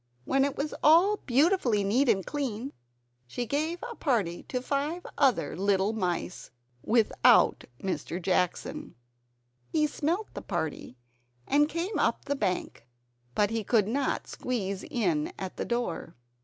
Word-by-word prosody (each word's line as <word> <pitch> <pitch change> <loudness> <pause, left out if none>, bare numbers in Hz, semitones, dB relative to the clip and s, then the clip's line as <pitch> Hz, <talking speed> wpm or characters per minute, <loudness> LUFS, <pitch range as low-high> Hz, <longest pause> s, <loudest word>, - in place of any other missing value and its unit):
When 270 - +2
it 280 0 -1
was 290 +2 -2
all 350 +7 +6
beautifully 260 - +3
neat 240 +7 +2
and 195 -4 +2
clean, 270 -3 -3 0.5
she 240 - -3
gave 310 +7 -1
a 480 - -5
party 220 - 0
to 255 - -1
five 290 +7 -2
other 270 -4 +2
little 195 +2 +1
mice, 180 -3 -3 0.3
without 225 -1 +4
Mr. 185 -2 -3
Jackson. 180 0 -1 0.8
He 305 -1 +3
smelt 335 +8 -2
the - - -6
party 160 - -4 0.5
and 295 +1 +3
came 340 +6 -2
up - - +1
the 285 - -1
bank, 185 - -3 0.5
but 205 0 +2
he 225 -1 -1
could 210 -1 +2
not 270 +4 -1
squeeze 200 -6 -3
in 175 -11 0
at 190 -1 -6
the - - -2
door. 235 -9 -3
240 Hz, 140 wpm, -28 LUFS, 195-290 Hz, 0.8 s, all